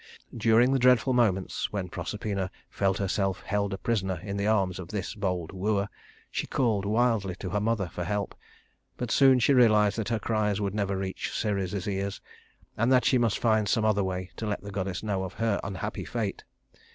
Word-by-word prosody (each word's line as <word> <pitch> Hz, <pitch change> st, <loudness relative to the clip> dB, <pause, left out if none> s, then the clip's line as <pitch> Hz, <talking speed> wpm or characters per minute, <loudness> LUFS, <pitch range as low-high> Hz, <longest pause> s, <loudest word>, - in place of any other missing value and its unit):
During 115 Hz, +2 st, +4 dB
the 135 Hz, -, +2 dB
dreadful 125 Hz, +1 st, +4 dB
moments 100 Hz, -7 st, +1 dB
when 100 Hz, -3 st, -3 dB
Proserpina 95 Hz, +2 st, -3 dB, 0.2 s
felt 95 Hz, -1 st, +1 dB
herself 95 Hz, -2 st, -1 dB
held 100 Hz, 0 st, -1 dB
a 95 Hz, -, -3 dB
prisoner 95 Hz, -6 st, -1 dB
in 100 Hz, -1 st, -4 dB
the 100 Hz, +1 st, -1 dB
arms 95 Hz, -4 st, +1 dB
of 90 Hz, -, -7 dB
this 100 Hz, 0 st, -4 dB
bold 90 Hz, -5 st, -2 dB
wooer, 100 Hz, +1 st, 0 dB, 0.4 s
she -, -, -2 dB
called 110 Hz, -6 st, +1 dB
wildly 110 Hz, -4 st, +1 dB
to 95 Hz, 0 st, -6 dB
her 105 Hz, -, +1 dB
mother 105 Hz, -3 st, 0 dB
for 85 Hz, +1 st, -5 dB
help; 100 Hz, +2 st, -2 dB, 0.6 s
but 125 Hz, -2 st, -3 dB
soon 135 Hz, -2 st, +6 dB
she 125 Hz, +3 st, +3 dB
realized 110 Hz, -4 st, +4 dB
that 110 Hz, -, -2 dB
her 115 Hz, -, +1 dB
cries 105 Hz, -2 st, 0 dB
would 100 Hz, -2 st, -1 dB
never 100 Hz, -2 st, -1 dB
reach 95 Hz, -1 st, -4 dB
Ceres's 100 Hz, -3 st, -2 dB
ears, 100 Hz, 0 st, -2 dB, 0.6 s
and 115 Hz, +4 st, +1 dB
that 125 Hz, -2 st, +4 dB
she 130 Hz, -, +4 dB
must 115 Hz, -3 st, +2 dB
find 110 Hz, -3 st, +2 dB
some 110 Hz, +2 st, +2 dB
other 105 Hz, -2 st, +2 dB
way 95 Hz, 0 st, -3 dB
to 110 Hz, -, -3 dB
let 105 Hz, -, -2 dB
the 100 Hz, -, -8 dB
goddess 95 Hz, -1 st, -3 dB
know 100 Hz, -3 st, -1 dB
of 95 Hz, 0 st, -6 dB
her 115 Hz, -2 st, 0 dB
unhappy 95 Hz, -3 st, -4 dB
fate. -, -, -3 dB
100 Hz, 195 wpm, -28 LUFS, 95-110 Hz, 0.6 s, soon